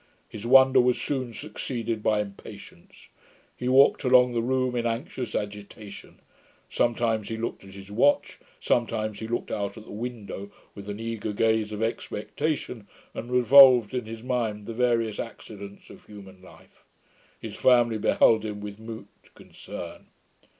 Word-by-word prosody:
His 110 Hz, +2 st, -7 dB
wonder 130 Hz, 0 st, +7 dB
was 125 Hz, -1 st, +1 dB
soon 130 Hz, 0 st, -2 dB
succeeded 115 Hz, +1 st, -4 dB
by 105 Hz, 0 st, +2 dB
impatience. 100 Hz, -1 st, -12 dB, 0.5 s
He 125 Hz, -, -3 dB
walked 135 Hz, +2 st, +5 dB
about 125 Hz, -1 st, +5 dB
the 115 Hz, -, 0 dB
room 130 Hz, +1 st, 0 dB
in 120 Hz, -1 st, 0 dB
anxious 120 Hz, -1 st, -4 dB
agitation; 105 Hz, 0 st, -7 dB, 0.5 s
sometimes 115 Hz, -3 st, 0 dB
he 115 Hz, -, -4 dB
looked 115 Hz, -2 st, -5 dB
at 95 Hz, 0 st, -13 dB
his 100 Hz, 0 st, -11 dB
watch, 130 Hz, +7 st, +2 dB, 0.2 s
sometimes 110 Hz, -3 st, -1 dB
he 110 Hz, -, -5 dB
looked 120 Hz, +1 st, -3 dB
out 100 Hz, +2 st, -3 dB
at 110 Hz, -, -11 dB
the -, -, -12 dB
window 105 Hz, -3 st, -6 dB, 0.2 s
with 100 Hz, 0 st, -10 dB
an 105 Hz, +1 st, -5 dB
eager 115 Hz, -2 st, -4 dB
gaze 110 Hz, 0 st, +1 dB
of 105 Hz, +1 st, -3 dB
expectation, 115 Hz, +1 st, -3 dB, 0.3 s
and 120 Hz, -, -7 dB
revolved 125 Hz, -2 st, +7 dB
in 125 Hz, -3 st, -2 dB
his 115 Hz, 0 st, -8 dB
mind 115 Hz, -5 st, -2 dB
the 115 Hz, -, -6 dB
various 115 Hz, -2 st, 0 dB
accidents 100 Hz, -3 st, -9 dB
of -, -, -16 dB
human 95 Hz, -3 st, -13 dB
life. 95 Hz, -, -19 dB, 0.6 s
His -, -, -8 dB
family 120 Hz, -3 st, +3 dB
beheld 110 Hz, +1 st, +3 dB
him 105 Hz, -1 st, -5 dB
with 105 Hz, 0 st, -8 dB
mute 110 Hz, 0 st, -11 dB
concern. -, -, -10 dB
115 Hz, 150 wpm, -26 LUFS, 105-125 Hz, 0.6 s, wonder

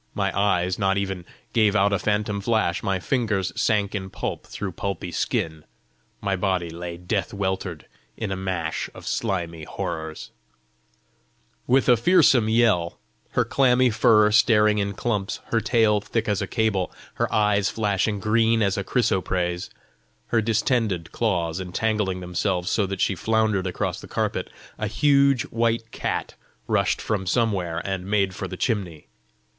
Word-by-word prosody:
My 100 Hz, -2 st, -1 dB
eyes 95 Hz, -2 st, +1 dB
not 95 Hz, -1 st, +2 dB
even 95 Hz, -3 st, -3 dB, 0.3 s
gave 110 Hz, -3 st, +3 dB
out 100 Hz, 0 st, +3 dB
a 100 Hz, -, +1 dB
phantom 105 Hz, +1 st, -1 dB
flash; 110 Hz, -4 st, +1 dB
My 95 Hz, -1 st, -1 dB
fingers 105 Hz, -6 st, -1 dB
sank 105 Hz, -2 st, +1 dB
in 95 Hz, -2 st, -4 dB
pulp -, -, -5 dB
through 100 Hz, -2 st, -5 dB
pulpy 90 Hz, -1 st, -4 dB
skin; 80 Hz, -2 st, -2 dB, 0.6 s
My 100 Hz, -1 st, 0 dB
body 90 Hz, -3 st, -1 dB
lay 85 Hz, +1 st, -6 dB
death 100 Hz, +4 st, -2 dB
weltered 95 Hz, -4 st, -3 dB, 0.3 s
in 110 Hz, -3 st, -3 dB
a -, -, -1 dB
mash 95 Hz, -4 st, -3 dB
Of -, -, -11 dB
slimy 85 Hz, -4 st, -2 dB
horrors 80 Hz, 0 st, -5 dB, 0.7 s
" -, -, -41 dB
With 130 Hz, +2 st, +3 dB
a 125 Hz, -, +7 dB
fearsome 135 Hz, -, +4 dB
yell, 110 Hz, -7 st, +2 dB, 0.4 s
her -, -, +2 dB
clammy 130 Hz, -2 st, +3 dB
fur 105 Hz, -1 st, +4 dB
staring 105 Hz, -1 st, +4 dB
in 100 Hz, 0 st, -1 dB
clumps, 105 Hz, -2 st, -2 dB
her 115 Hz, -, +2 dB
tail 110 Hz, -4 st, +3 dB
thick 115 Hz, +2 st, -2 dB
as 105 Hz, -2 st, 0 dB
a -, -, -2 dB
cable, 110 Hz, -6 st, 0 dB, 0.3 s
her -, -, +1 dB
eyes 105 Hz, -2 st, +2 dB
flashing 105 Hz, -1 st, 0 dB
green 115 Hz, +2 st, +2 dB
as 100 Hz, -1 st, +1 dB
a 100 Hz, -, -1 dB
chrysoprase, 90 Hz, -6 st, 0 dB, 0.6 s
her 115 Hz, -, +2 dB
distended 110 Hz, -5 st, 0 dB
claws 90 Hz, -6 st, -1 dB
entangling 95 Hz, 0 st, -1 dB
themselves 90 Hz, 0 st, -1 dB
so 100 Hz, -3 st, +1 dB
that 95 Hz, 0 st, -4 dB
she -, -, +2 dB
floundered 110 Hz, -2 st, +1 dB
across 90 Hz, -, -3 dB
the -, -, -10 dB
carpet, -, -, -2 dB, 0.3 s
a 105 Hz, -, -1 dB
huge 140 Hz, +3 st, +3 dB
white 115 Hz, 0 st, 0 dB
cat -, -, -3 dB, 0.3 s
rushed -, -, +1 dB
from 100 Hz, -4 st, -2 dB
somewhere, 95 Hz, -6 st, 0 dB
and 95 Hz, -1 st, -3 dB
made 100 Hz, -2 st, +1 dB
for -, -, -5 dB
the -, -, -7 dB
chimney. 95 Hz, -, -2 dB
100 Hz, 155 wpm, -24 LUFS, 90-110 Hz, 0.7 s, a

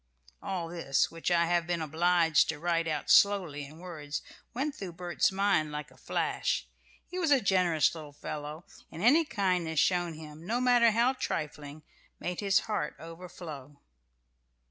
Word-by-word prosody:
All 180 Hz, -4 st, -3 dB
this, 165 Hz, -6 st, 0 dB
which 165 Hz, +1 st, -3 dB
I 170 Hz, -1 st, +3 dB
have 170 Hz, 0 st, +1 dB
been 175 Hz, -1 st, 0 dB
obliged 165 Hz, 0 st, +3 dB
to 160 Hz, -, -2 dB
write 165 Hz, +1 st, 0 dB
out 155 Hz, -, -1 dB
slowly 180 Hz, -8 st, +4 dB
in 150 Hz, +3 st, -13 dB
words, 155 Hz, -5 st, -6 dB, 0.3 s
went 275 Hz, +5 st, -2 dB
through 190 Hz, -7 st, -7 dB
Bert's 175 Hz, +1 st, 0 dB
mind 190 Hz, -6 st, +1 dB
like 150 Hz, -1 st, -6 dB
a -, -, -18 dB
flash. -, -, -1 dB, 0.4 s
He 365 Hz, +1 st, -5 dB
was 335 Hz, -4 st, +1 dB
a 280 Hz, -2 st, +6 dB
generous 180 Hz, -7 st, +2 dB
little 155 Hz, -3 st, -9 dB
fellow, 150 Hz, +2 st, -7 dB, 0.3 s
and 170 Hz, -, -6 dB
any 300 Hz, +8 st, +5 dB
kindness 180 Hz, -, 0 dB
shown 175 Hz, -3 st, +1 dB
him, 155 Hz, 0 st, -11 dB
no 230 Hz, +7 st, -1 dB
matter 245 Hz, -2 st, +5 dB
how 235 Hz, +4 st, +3 dB
trifling, 150 Hz, -, -5 dB, 0.4 s
made 180 Hz, 0 st, -4 dB
his 200 Hz, -2 st, +3 dB
heart 180 Hz, -10 st, -3 dB
overflow. 165 Hz, -3 st, -10 dB
170 Hz, 160 wpm, -30 LUFS, 155-195 Hz, 0.4 s, a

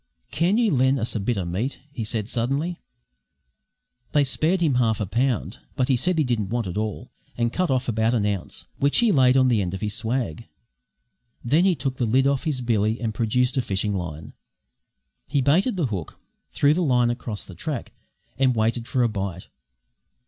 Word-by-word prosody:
"Can 175 Hz, +7 st, +2 dB
you 230 Hz, -6 st, +3 dB
len' 130 Hz, +1 st, +3 dB
us 115 Hz, -2 st, -1 dB
a 110 Hz, -, -1 dB
bit 105 Hz, +3 st, -1 dB
o' 95 Hz, -, -2 dB
meat?" 100 Hz, +11 st, -2 dB, 0.3 s
said 105 Hz, -1 st, -2 dB
he -, -, -14 dB
suddenly. 140 Hz, +10 st, -1 dB, 1.3 s
They 145 Hz, -, +4 dB
spared 155 Hz, +7 st, +1 dB
him 155 Hz, -5 st, +3 dB
half 110 Hz, -3 st, +1 dB
a 105 Hz, -, -1 dB
pound; 115 Hz, -1 st, -1 dB, 0.2 s
but 130 Hz, 0 st, 0 dB
he 130 Hz, -, +4 dB
said 180 Hz, +8 st, 0 dB
he 155 Hz, -, +3 dB
didn't 115 Hz, -7 st, -1 dB
want 120 Hz, 0 st, -1 dB
it 90 Hz, -, -5 dB
all, 105 Hz, 0 st, -3 dB, 0.3 s
and 120 Hz, 0 st, 0 dB
cut 185 Hz, -2 st, 0 dB
off 130 Hz, -1 st, 0 dB
about 110 Hz, +1 st, +1 dB
an 105 Hz, -3 st, +1 dB
ounce, 100 Hz, -3 st, -3 dB
which 140 Hz, +1 st, +2 dB
he 235 Hz, -2 st, +4 dB
laid 130 Hz, -5 st, +5 dB
on 130 Hz, -1 st, +5 dB
the 115 Hz, -4 st, +3 dB
end 90 Hz, 0 st, -2 dB
of 95 Hz, -, -7 dB
his 105 Hz, -1 st, -2 dB
swag. 115 Hz, -7 st, -2 dB, 1.0 s
Then 155 Hz, +9 st, +3 dB
he 190 Hz, -2 st, +3 dB
took 130 Hz, -2 st, -3 dB
the 120 Hz, -, 0 dB
lid 130 Hz, +4 st, +3 dB
off 140 Hz, -1 st, +1 dB
his 145 Hz, -5 st, -1 dB
billy 110 Hz, -1 st, +1 dB
and 115 Hz, -3 st, -2 dB
produced 125 Hz, +4 st, +1 dB
a -, -, +3 dB
fishing 100 Hz, -1 st, -1 dB
line. 80 Hz, -5 st, -5 dB, 0.9 s
He 145 Hz, -, 0 dB
baited 165 Hz, -, +2 dB
the 175 Hz, -5 st, 0 dB
hook, 95 Hz, -9 st, -5 dB, 0.3 s
threw 145 Hz, +1 st, +3 dB
the 180 Hz, -, 0 dB
line 125 Hz, -6 st, +3 dB
across 120 Hz, -3 st, -5 dB
the 95 Hz, -, -11 dB
track, 145 Hz, -, -5 dB, 0.5 s
and 130 Hz, -2 st, +3 dB
waited 115 Hz, +2 st, 0 dB
for 125 Hz, -, +1 dB
a -, -, +4 dB
bite. 95 Hz, -5 st, -5 dB
120 Hz, 200 wpm, -24 LUFS, 110-140 Hz, 1.3 s, laid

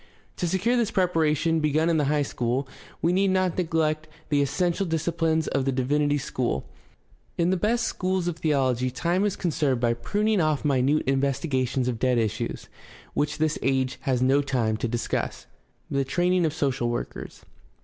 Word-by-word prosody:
To 175 Hz, -, -1 dB
secure 190 Hz, +8 st, +1 dB
this 235 Hz, -4 st, +1 dB
preparation, 165 Hz, -4 st, +1 dB
begun 155 Hz, +1 st, +1 dB
in. 165 Hz, -1 st, +2 dB
the 150 Hz, -, +2 dB
high 145 Hz, +1 st, +2 dB
school, 125 Hz, +1 st, -2 dB, 0.4 s
he 170 Hz, +2 st, +3 dB
need 195 Hz, +2 st, +3 dB
not 185 Hz, -2 st, +1 dB
neglect 160 Hz, -3 st, 0 dB, 0.2 s
the 145 Hz, -1 st, +3 dB
essential 180 Hz, +6 st, 0 dB
disciplines 160 Hz, 0 st, 0 dB
of 135 Hz, -, 0 dB
the 135 Hz, -, 0 dB
divinity 145 Hz, +3 st, +1 dB
school. 130 Hz, -, -2 dB, 0.7 s
In 175 Hz, +1 st, +2 dB
the -, -, +3 dB
best 225 Hz, +6 st, +1 dB
schools 185 Hz, -1 st, -1 dB
of 175 Hz, -2 st, -2 dB
theology 130 Hz, -5 st, +1 dB
time 170 Hz, +9 st, 0 dB
is 205 Hz, -, 0 dB
conserved 150 Hz, -7 st, 0 dB
by 120 Hz, -1 st, +2 dB
pruning 205 Hz, -, 0 dB
off 155 Hz, -2 st, 0 dB
minute 140 Hz, +1 st, +2 dB
investigations 135 Hz, -2 st, 0 dB
of 120 Hz, -3 st, -2 dB
dead 125 Hz, -1 st, +2 dB
issues 110 Hz, +1 st, -2 dB, 0.5 s
which 145 Hz, -, -1 dB
this 155 Hz, -1 st, 0 dB
age 130 Hz, -1 st, 0 dB
has 130 Hz, -3 st, 0 dB
no 135 Hz, +2 st, +4 dB
time 120 Hz, -6 st, 0 dB
to 120 Hz, -, -2 dB
discuss. 115 Hz, 0 st, -3 dB, 0.5 s
The 140 Hz, 0 st, +1 dB
training 175 Hz, +4 st, +1 dB
of 150 Hz, -, -3 dB
social 130 Hz, -5 st, 0 dB
workers. 120 Hz, -, -6 dB
150 Hz, 170 wpm, -25 LUFS, 130-170 Hz, 0.7 s, no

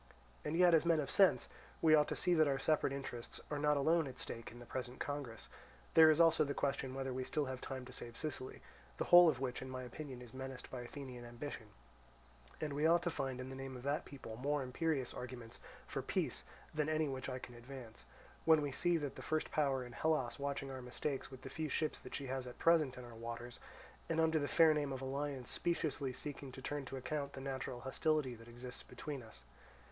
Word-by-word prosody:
And 155 Hz, +2 st, -1 dB
yet, 180 Hz, -1 st, +7 dB
as 160 Hz, -, +6 dB
men 165 Hz, -2 st, +4 dB
of 140 Hz, -, -2 dB
sense, 195 Hz, -2 st, +5 dB, 0.3 s
we 160 Hz, -1 st, +6 dB
ought 150 Hz, -1 st, +6 dB
to -, -, -2 dB
see 180 Hz, -, +3 dB
that 155 Hz, -2 st, +5 dB
our 135 Hz, -1 st, +2 dB
separate 155 Hz, -1 st, +2 dB
interests 135 Hz, -4 st, -5 dB
are 150 Hz, -, 0 dB
not 150 Hz, 0 st, +3 dB
alone 160 Hz, +2 st, +3 dB
at 130 Hz, -1 st, -8 dB
stake 115 Hz, -2 st, -5 dB
in 120 Hz, -, -11 dB
the 120 Hz, -, -10 dB
present 125 Hz, 0 st, -5 dB
congress: 140 Hz, -6 st, -4 dB, 0.5 s
there 160 Hz, -1 st, +9 dB
is 155 Hz, 0 st, +4 dB
also 165 Hz, -2 st, +6 dB
the 140 Hz, -1 st, -2 dB
question 135 Hz, -2 st, -1 dB
whether 135 Hz, -1 st, -2 dB
we 130 Hz, -, -2 dB
have 130 Hz, -, -4 dB
still 130 Hz, -4 st, -1 dB
time 130 Hz, 0 st, -5 dB
to -, -, -10 dB
save 120 Hz, -1 st, -6 dB
Sicily, 140 Hz, -4 st, -5 dB, 0.3 s
the -, -, 0 dB
whole 175 Hz, -1 st, +9 dB
of 135 Hz, -5 st, 0 dB
which 130 Hz, -2 st, -2 dB
in 130 Hz, -, -6 dB
my 130 Hz, 0 st, -4 dB
opinion 130 Hz, +1 st, -7 dB
is 120 Hz, -, -13 dB
menaced 130 Hz, 0 st, -6 dB
by 125 Hz, -, -4 dB
Athenian 125 Hz, -1 st, -7 dB
ambition; 120 Hz, -1 st, -6 dB, 0.9 s
and 150 Hz, -2 st, -2 dB
we 150 Hz, +3 st, +3 dB
ought 170 Hz, +1 st, +5 dB
to 175 Hz, -, 0 dB
find 135 Hz, -3 st, -2 dB
in 130 Hz, +1 st, -5 dB
the 135 Hz, -, -6 dB
name 135 Hz, -1 st, -6 dB
of 125 Hz, -, -10 dB
that 140 Hz, +2 st, 0 dB
people 135 Hz, -5 st, -8 dB
more 145 Hz, +2 st, 0 dB
imperious 135 Hz, 0 st, 0 dB
arguments 125 Hz, -2 st, -7 dB, 0.3 s
for -, -, -3 dB
peace -, -, -1 dB, 0.3 s
than 155 Hz, 0 st, +1 dB
any 155 Hz, 0 st, +2 dB
which 135 Hz, -1 st, -3 dB
I 130 Hz, -, -2 dB
can 125 Hz, -1 st, -9 dB
advance, 120 Hz, -1 st, -10 dB, 0.4 s
when 160 Hz, -2 st, +6 dB
we 145 Hz, -, -1 dB
see 175 Hz, +5 st, +2 dB
the 145 Hz, -3 st, -2 dB
first 155 Hz, 0 st, -1 dB
power 135 Hz, -4 st, +2 dB
in 120 Hz, -, -9 dB
Hellas 145 Hz, -2 st, 0 dB
watching 140 Hz, -1 st, -2 dB
our 130 Hz, -1 st, -5 dB
mistakes 130 Hz, +3 st, -3 dB
with 130 Hz, -1 st, -11 dB
the -, -, -6 dB
few 155 Hz, -1 st, -2 dB
ships 155 Hz, +1 st, 0 dB
that -, -, -7 dB
she 140 Hz, -, -3 dB
has 130 Hz, -1 st, -3 dB
at 125 Hz, -, -8 dB
present 155 Hz, -6 st, +4 dB
in 125 Hz, -, -7 dB
our 120 Hz, -, -10 dB
waters, 115 Hz, +1 st, -6 dB, 0.5 s
and 165 Hz, -1 st, +1 dB
under 160 Hz, 0 st, +4 dB
the 145 Hz, -, 0 dB
fair 160 Hz, 0 st, +6 dB
name 145 Hz, -2 st, 0 dB
of 130 Hz, -, -4 dB
alliance 135 Hz, -1 st, -3 dB
speciously 150 Hz, -6 st, 0 dB
seeking 140 Hz, +1 st, -5 dB
to 130 Hz, -, -8 dB
turn 145 Hz, 0 st, -2 dB
to 135 Hz, -, -5 dB
account 140 Hz, +2 st, -3 dB
the -, -, -6 dB
natural 130 Hz, -2 st, -4 dB
hostility 130 Hz, +1 st, +1 dB
that 115 Hz, 0 st, -12 dB
exists 125 Hz, +1 st, -7 dB
between 145 Hz, -3 st, -6 dB
us. 110 Hz, -, -12 dB
135 Hz, 225 wpm, -37 LUFS, 125-150 Hz, 0.9 s, there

